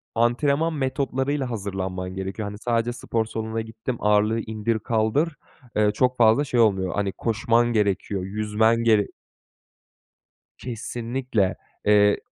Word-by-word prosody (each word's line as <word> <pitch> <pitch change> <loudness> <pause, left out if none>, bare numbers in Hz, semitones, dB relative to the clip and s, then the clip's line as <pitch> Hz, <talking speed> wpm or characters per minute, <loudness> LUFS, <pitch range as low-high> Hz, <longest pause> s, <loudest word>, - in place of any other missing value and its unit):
antrenman 140 +7 +2
metotlarıyla 135 0 -1
hazırlanman 95 -3 -4
gerekiyor. 95 +2 -4
Hani, 105 - -8
sadece 120 +1 0
spor 115 -2 -2
salonuna 110 0 -3
gittim, 110 +2 -5
ağırlığı 105 +2 +2
indir 110 0 -2
kaldır, 115 +9 0 0.4
eee, 105 -1 +3
çok 125 +3 +1
fazla 115 +5 +5
şey 125 -4 -1
olmuyor, 95 -5 +3
hani, 100 -1 -1
koşman 115 +1 +1
gerekiyor, 100 -2 0
yüzmen 110 +3 +1
gerek 110 -3 +3 1.5
Kesinlikle. 120 -3 -2 0.3
Eee 105 0 +5
110 Hz, 115 wpm, -24 LUFS, 105-120 Hz, 1.5 s, fazla